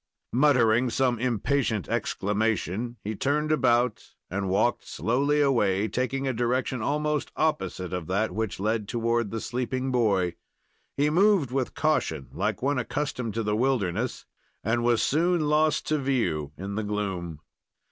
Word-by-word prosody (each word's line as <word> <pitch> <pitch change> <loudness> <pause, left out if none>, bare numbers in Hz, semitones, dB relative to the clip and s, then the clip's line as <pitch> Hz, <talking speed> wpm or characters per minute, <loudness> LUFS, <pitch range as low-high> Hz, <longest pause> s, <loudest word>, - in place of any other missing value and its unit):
Muttering 125 -3 +4
some 125 -1 +1
impatient 120 -2 0
exclamation, 110 +2 -1
he 110 +2 -3
turned 150 +6 0
about 125 -4 +1 0.2
and 95 0 -2
walked 110 +6 +1
slowly 140 +6 +1
away, 105 -7 +2
taking 130 +5 -1
a 130 - 0
direction 125 +1 -1
almost 150 +4 0
the - - -4
opposite 95 - -1
of 90 -3 -3
that 100 +4 0
which 110 -3 -3
led 105 +1 -1
toward 115 -1 0
the 115 - -3
sleeping 130 +2 -2
boy. 100 -8 +2 0.6
He 145 +2 +2
moved 185 - +3
with 130 -1 -2
caution, 80 - 0
like - - -2
one 140 -1 +1
accustomed 125 -4 -3
to 115 - 0
the 105 0 0
wilderness, 120 -2 0 0.4
and 120 +3 +1
was 120 -2 +3
soon 170 +3 +2
lost 150 0 +2
to 155 -1 +2
view 90 - 0
in 100 +1 -5
the 110 +2 -2
gloom. 95 -6 -3
120 Hz, 145 wpm, -26 LUFS, 105-135 Hz, 0.6 s, Muttering